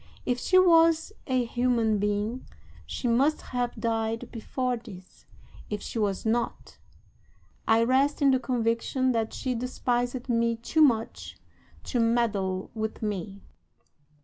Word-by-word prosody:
If 245 0 0
she 370 - +3
was 330 0 +5
a 255 -2 +1
human 230 -3 +1
being 210 +4 -2 0.4
she 250 - -3
must 270 +6 +2
have 245 -1 -3
died 225 -1 -2
before 250 +2 -2
this; 195 -6 -13 0.4
if 210 - -3
she 225 - -5
was 200 -1 -1
not, 235 +1 -2 0.9
I 225 +1 +4
rest 265 +4 +2
in 280 -2 +4
the 260 - +3
conviction 245 +1 0
that 225 -2 -1
she 255 - -3
despised 245 0 -2
me 230 -1 +1
too 235 +8 0
much 230 -7 +1 0.5
to 245 - -2
meddle 210 -5 0
with 220 0 -4
me. 200 -1 -4
235 Hz, 130 wpm, -27 LUFS, 220-255 Hz, 0.9 s, was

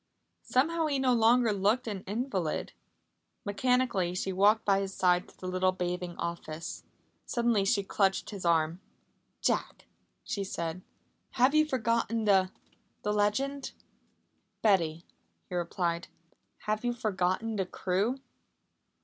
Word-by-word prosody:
Somehow 320 +5 +1
he 285 -2 0
no 260 -1 +3
longer 230 0 +4
looked 210 +6 +1
an 200 -4 -3
invalid. 200 - -2 0.7
Mechanically 205 -4 +1
she 190 +1 -2
walked 210 +4 +4
by 195 -1 +4
his 195 -1 -4
side 180 -1 +2
to - - -21
the 185 - -7
little 185 0 +2
bathing 180 -1 -3
office. 165 -1 -5 0.4
Suddenly 235 -5 +2
she 200 0 +2
clutched 195 +1 0
his 200 -3 -7
arm. 165 +1 +2 0.6
"Jack," - - -1 0.4
she 200 - -3
said, 170 -2 -4 0.5
"have 255 +3 +4
you 310 0 +4
forgotten 230 -3 0
the 190 -2 +4 0.5
the 210 - 0
legend?" 265 +7 0 0.9
"Betty," 170 -6 +2 0.4
he - - -8
replied, 170 0 -1 0.6
"have 215 +1 -1
you 245 0 +1
forgotten 215 0 -1
the 190 -2 -1
crew?" 195 +9 0
200 Hz, 125 wpm, -30 LUFS, 180-235 Hz, 0.9 s, longer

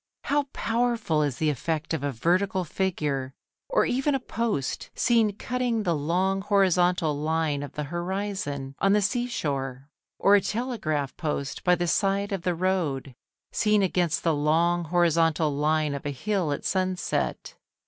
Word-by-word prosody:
How 290 0 +1
powerful 230 -9 0
is 145 -5 -1
the 155 +1 +2
effect 155 +3 -2
of 160 - -2
a 145 - 0
vertical 185 - +1
figure, 150 -7 -2 0.3
or - - +3
even 270 +3 +1
a - - 0
post, 225 - -2
seen 225 -4 +3
cutting 245 -1 -1
the 175 -4 +1
long 180 +6 0
horizontal 180 -5 +2
line 155 -1 0
of 145 - -7
the 150 - -3
horizon 175 -4 -3
on 195 0 +3
the 210 - +4
sea 240 +5 0
shore. 135 - -3 0.3
Or 200 - +4
a 205 - +6
telegraph 200 - -2
post 150 -4 -3
by 180 -2 +4
the 175 0 -1
side 200 +3 +1
of 195 -3 -2
the 175 0 0
road, 165 -7 -1 0.4
seen 210 -1 +2
against 180 -3 +1
the 165 - +3
long 165 +4 +2
horizontal 165 -2 +2
line 150 0 +1
of 140 - -5
a - - 0
hill 180 +3 -1
at 145 - -3
sunset. 185 -1 -1
175 Hz, 160 wpm, -26 LUFS, 150-200 Hz, 0.4 s, a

